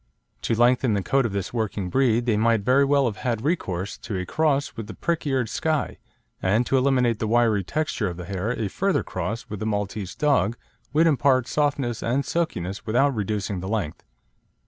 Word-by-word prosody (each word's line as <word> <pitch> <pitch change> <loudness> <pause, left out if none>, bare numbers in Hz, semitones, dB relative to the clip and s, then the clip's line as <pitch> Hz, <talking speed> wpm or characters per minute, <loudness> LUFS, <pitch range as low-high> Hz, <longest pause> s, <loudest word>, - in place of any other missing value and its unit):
To 115 - 0
lengthen 120 0 +3
the 100 - -1
coat 135 +5 +2
of - - -7
this 100 +1 -3
working 105 -5 -2
breed 120 -2 +2
they 115 -3 +2
might 115 0 +2
very 130 +6 +4
well 140 0 +3
have 110 -4 -2
had 115 -3 -2
recourse 100 - -2
to 105 -4 -4
a 90 - -3
cross 145 - 0
with 115 -2 -6
the 105 - -8
prick 170 - -2
eared 130 -4 +1
Skye, 155 +7 -1 0.4
and 105 +6 +2
to 135 - +1
eliminate 125 -4 +2
the 110 - -1
wiry 115 -3 +3
texture 155 - -1
of 85 - -7
the 90 - -7
hair 100 +3 -3
a 115 -3 -1
further 195 - 0
cross 95 +6 -4
with 105 - -6
the 110 - -2
Maltese 105 -2 -3
dog 130 -7 +2 0.3
would 155 +3 +4
impart 130 -4 +3
softness 140 -6 0
and 130 +4 0
silkiness 100 - -2
without 125 +6 +2
reducing 105 -3 -2
the 95 +2 -5
length. 100 -8 -2
115 Hz, 195 wpm, -24 LUFS, 100-135 Hz, 0.4 s, very